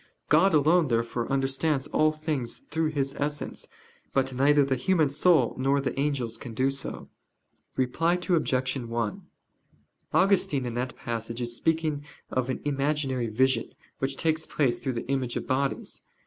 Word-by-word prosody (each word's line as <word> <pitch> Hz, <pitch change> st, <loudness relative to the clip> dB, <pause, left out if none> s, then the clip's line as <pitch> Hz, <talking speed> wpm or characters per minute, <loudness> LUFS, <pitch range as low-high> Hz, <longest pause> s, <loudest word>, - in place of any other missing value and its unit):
God 165 Hz, +4 st, +5 dB
alone, 160 Hz, +3 st, +4 dB
therefore, 115 Hz, 0 st, -1 dB
understands 135 Hz, +1 st, +1 dB
all 155 Hz, +1 st, +2 dB
things 155 Hz, -6 st, -4 dB
through 160 Hz, +1 st, +1 dB
His 140 Hz, -3 st, -1 dB
Essence: 145 Hz, +1 st, -3 dB, 0.5 s
but 135 Hz, -1 st, +1 dB
neither 140 Hz, +2 st, +4 dB
the 135 Hz, -1 st, +1 dB
human 155 Hz, +2 st, +2 dB
soul 150 Hz, -4 st, +3 dB
nor 135 Hz, +2 st, +2 dB
the 135 Hz, 0 st, -2 dB
angels 130 Hz, -6 st, -1 dB
can 120 Hz, -4 st, -8 dB
do 130 Hz, +3 st, +2 dB
so. 135 Hz, -, -5 dB, 0.7 s
Reply 165 Hz, +7 st, +1 dB
Obj. 160 Hz, -8 st, 0 dB
1: 115 Hz, -3 st, -3 dB, 0.9 s
Augustine 185 Hz, -9 st, +3 dB
in 120 Hz, -, -3 dB
that 125 Hz, +2 st, -3 dB
passage 115 Hz, 0 st, -4 dB
is 120 Hz, -1 st, -3 dB
speaking 160 Hz, -1 st, 0 dB, 0.3 s
of 130 Hz, 0 st, -1 dB
an 130 Hz, -, -2 dB
imaginary 140 Hz, -3 st, 0 dB
vision, 130 Hz, +5 st, +1 dB, 0.2 s
which 135 Hz, 0 st, -2 dB
takes 160 Hz, -1 st, 0 dB
place 135 Hz, -5 st, +1 dB
through 130 Hz, -, -2 dB
the 115 Hz, -, -5 dB
image 130 Hz, -3 st, -1 dB
of -, -, -4 dB
bodies. 135 Hz, +1 st, -1 dB
135 Hz, 150 wpm, -27 LUFS, 125-155 Hz, 0.9 s, God